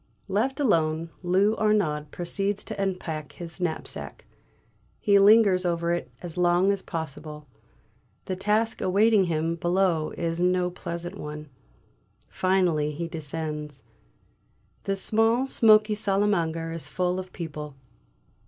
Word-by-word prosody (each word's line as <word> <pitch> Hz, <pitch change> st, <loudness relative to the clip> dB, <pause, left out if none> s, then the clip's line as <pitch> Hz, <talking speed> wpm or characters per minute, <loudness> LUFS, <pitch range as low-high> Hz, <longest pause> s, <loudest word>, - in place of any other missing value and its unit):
Left 225 Hz, +9 st, 0 dB
alone, 165 Hz, -, +1 dB
Lou 190 Hz, +4 st, +2 dB
Arnaud 190 Hz, -9 st, +1 dB
proceeds 195 Hz, +5 st, -2 dB
to 210 Hz, -2 st, -5 dB
unpack 165 Hz, -6 st, -3 dB
his 175 Hz, +1 st, -8 dB
knapsack; 170 Hz, -3 st, -4 dB, 0.7 s
he 200 Hz, -1 st, +4 dB
lingers 200 Hz, -2 st, +6 dB
over 170 Hz, -1 st, 0 dB
it 175 Hz, -, -3 dB
as 175 Hz, 0 st, -6 dB
long 175 Hz, +2 st, +4 dB
as 200 Hz, -1 st, -2 dB
possible; 155 Hz, -2 st, -6 dB, 0.8 s
the 185 Hz, -, -3 dB
task 215 Hz, +4 st, 0 dB
awaiting 205 Hz, +1 st, +4 dB
him 165 Hz, -1 st, 0 dB
below 175 Hz, -2 st, +1 dB
is 165 Hz, 0 st, -2 dB
no 180 Hz, 0 st, +2 dB
pleasant 175 Hz, +2 st, -6 dB
one. 150 Hz, 0 st, -7 dB, 0.8 s
Finally 175 Hz, -5 st, +1 dB
he 170 Hz, +3 st, -4 dB
descends. 150 Hz, -2 st, -5 dB, 1.0 s
The 195 Hz, -, 0 dB
small 225 Hz, +5 st, +2 dB
smoky 215 Hz, -4 st, +4 dB
salle 200 Hz, -2 st, 0 dB
à 210 Hz, -, +3 dB
manger 165 Hz, -4 st, -1 dB
is 165 Hz, -1 st, -6 dB
full 180 Hz, 0 st, -1 dB
of 185 Hz, 0 st, -8 dB
people. 150 Hz, -4 st, -7 dB
180 Hz, 125 wpm, -26 LUFS, 160-200 Hz, 1.0 s, lingers